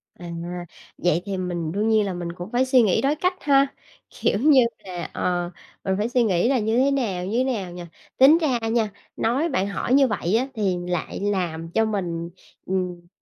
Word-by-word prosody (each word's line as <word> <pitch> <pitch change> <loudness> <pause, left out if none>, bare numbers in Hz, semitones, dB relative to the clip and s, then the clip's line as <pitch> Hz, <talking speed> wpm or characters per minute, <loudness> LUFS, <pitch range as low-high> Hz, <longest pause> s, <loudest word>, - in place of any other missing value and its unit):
À, 175 -1 -9 0.7
vậy 175 -1 +1
thì 195 -2 -3
mình 175 -3 -3
đương 210 +4 0
nhiên 215 -2 +3
là 195 - -2
mình 175 -1 -4
cũng 175 +4 -8
phải 250 +2 +2
suy 260 -2 +5
nghĩ 205 -5 +2
đối 280 +3 +2
cách 365 +4 +1
ha? 275 -1 +4 0.4
Kiểu 205 - 0
như 280 -1 +6 0.2
là, 180 -2 -5
ờ, 175 -1 -1 0.3
mình 190 - 0
phải 215 +3 -1
suy 245 -1 +2
nghĩ 200 +2 +2
là 265 -3 +2
như 220 +2 0
thế 275 +2 +3
nào, 210 -10 -1
như 215 +5 -2
thế 255 - +3
nào 210 -9 -2
nhỉ? 175 0 -7 0.3
Tính 280 +5 +8
ra 275 -8 +1
nha, 225 -2 +1 0.2
nói 270 +9 0
bạn 200 -8 0
hỏi 200 +5 -1
như 275 -1 +6
vậy 210 -3 -1
á 255 - 0
thì 195 -5 0
lại 175 -2 -3
làm 175 -5 -2
cho 225 +3 +2
mình, 175 -6 -3 0.4
ừm, 180 -2 -3
205 Hz, 210 wpm, -23 LUFS, 180-255 Hz, 0.7 s, Tính